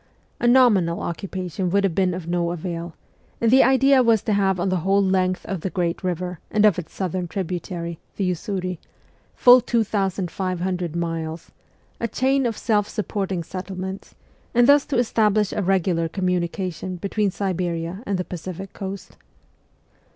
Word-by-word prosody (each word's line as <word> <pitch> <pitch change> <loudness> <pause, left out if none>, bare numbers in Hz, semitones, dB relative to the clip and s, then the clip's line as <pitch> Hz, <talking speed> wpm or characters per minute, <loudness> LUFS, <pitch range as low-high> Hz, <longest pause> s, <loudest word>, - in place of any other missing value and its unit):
A 240 - +1
nominal 215 -10 +4
occupation 180 0 -3
would 200 +2 +2
have 195 -4 +1
been 185 0 +1
of 180 -3 -6
no 170 0 0
avail, 170 -1 -5 0.4
and 230 -1 +2
the 265 - +7
idea 265 +1 +5
was 230 -4 +3
to 215 - 0
have 195 -2 +2
on 185 +2 0
the 185 - +1
whole 195 +4 +2
length 185 -1 +1
of 190 -4 -4
the 190 - -2
great 175 -2 -2
river 180 -1 -3
and 215 -1 +3
of 205 -4 +4
its 175 - -8
southern 185 -1 -3
tributary, 170 -1 -4 0.2
the 200 - -2
Usuri 185 -1 -3 0.6
full 250 0 +7
2,500 185 -5 -1
miles 165 -1 -4 0.5
a 235 - -1
chain 265 +3 +1
of 225 - -3
self 210 -3 +1
supporting 195 -4 -2
settle 185 +1 -7
ments, 190 +1 -6 0.4
and 240 0 +6
thus 285 +2 +5
to 280 - -1
establish 215 -3 +2
a - - -1
regular 180 -3 +1
communication 180 0 -2
between 200 +3 -1
Siberia 180 -1 -3
and 200 -1 0
the 180 - -3
Pacific 185 +2 -7
Coast. 195 0 -7
185 Hz, 160 wpm, -23 LUFS, 175-205 Hz, 0.6 s, the